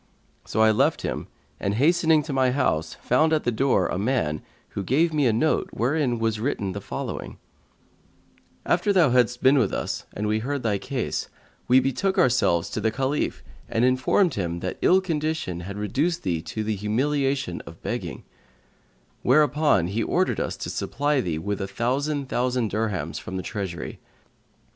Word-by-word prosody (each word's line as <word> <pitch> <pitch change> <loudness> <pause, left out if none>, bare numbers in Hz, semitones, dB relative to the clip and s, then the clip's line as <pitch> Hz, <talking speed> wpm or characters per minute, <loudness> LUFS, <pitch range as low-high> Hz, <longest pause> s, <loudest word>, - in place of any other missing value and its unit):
So 110 - 0
I 110 - +6
left 110 - +2
him - - -3 0.3
and, 100 +1 -1
hastening 160 +3 +4
to 145 - -5
my 130 -1 +3
house, 85 - 0
found 155 +6 +3
at 155 - +1
the 120 - +1
door 130 +4 +2
a 90 - -2
man 100 - 0 0.3
who - - -4
gave 155 - +2
me 145 -4 +3
a - - +4
note 120 +9 +1
wherein 130 0 +1
was 115 -1 0
written 105 -5 -1
the 100 +2 -5
following: - - -5 1.3
After 180 +4 +2
thou 175 -9 +4
hadst 125 0 +2
been 135 +2 +6
with 110 -7 +1
us - - -3
and 105 - -3
we 105 +1 +1
heard 140 +4 -3
thy 105 -3 0
case, 130 +1 -3 0.4
we 125 +1 +6
betook 135 +9 0
ourselves 115 -9 +3
to 110 - -3
the 110 - +2
Caliph 135 +5 -1 0.3
and 115 +2 +2
informed 130 +8 +3
him 85 -3 -2
that 95 - -4
ill 185 +1 +5
condition 155 - -2
had 100 +3 -7
reduced 145 - -1
thee 85 -3 -1
to 100 +7 -4
the 110 0 -1
humiliation 130 +1 0
of 85 - -12
begging; - - -4 1.0
where 145 +5 +5
upon 145 - +2
he 100 +6 -2
ordered - - +1
us - - -2
to - - -5
supply 145 -1 0
thee 85 -8 -2
with 100 +5 -3
a 95 - -2
thousand 135 +7 -1
thousand 125 -3 0
dirhams 105 -3 -2
from 95 - -6
the 95 - -4
Treasury. 95 -5 -5
125 Hz, 175 wpm, -25 LUFS, 105-145 Hz, 1.3 s, I